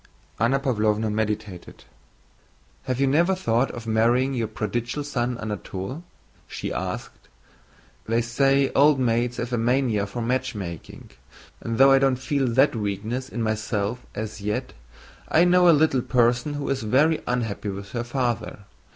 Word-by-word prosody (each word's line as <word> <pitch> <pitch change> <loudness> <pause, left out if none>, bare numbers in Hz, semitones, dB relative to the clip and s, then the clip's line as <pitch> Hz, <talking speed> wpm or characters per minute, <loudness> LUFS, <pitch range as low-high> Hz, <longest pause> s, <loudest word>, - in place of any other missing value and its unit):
Anna 125 +5 +2
Pávlovna 110 -5 0
meditated. 105 -4 -4 1.0
"Have 130 -1 -2
you 140 - +3
never 170 +8 +3
thought 120 -7 +1
of 120 -1 -8
marrying 120 +4 +2
your 115 -3 -1
prodigal 120 +6 -3
son 125 -4 -2
Anatole?" 105 - -5 0.4
she - - -5
asked. - - -5 0.8
"They 115 +1 +1
say 135 +3 +2
old 145 0 +5
maids 120 0 0
have 120 +1 -4
a 120 - +1
mania 115 -4 +1
for 120 +4 -5
matchmaking, 115 - -4 0.5
and 115 0 -4
though 135 +1 +7
I 135 - +6
don't 135 -1 +3
feel 130 +1 -1
that 130 +3 +3
weakness 110 +5 -3
in 120 - -3
myself 110 +1 -2
as 110 0 -5
yet, 105 +5 -3 0.6
I 165 - +5
know 180 0 +5
a - - +9
little 150 -4 +3
person 120 +4 +1
who 145 - -4
is 135 -1 -1
very 140 +9 +2
unhappy 115 -4 -2
with 100 +1 -7
her 120 -1 -3
father. 120 -5 -3
120 Hz, 150 wpm, -24 LUFS, 110-135 Hz, 1.0 s, a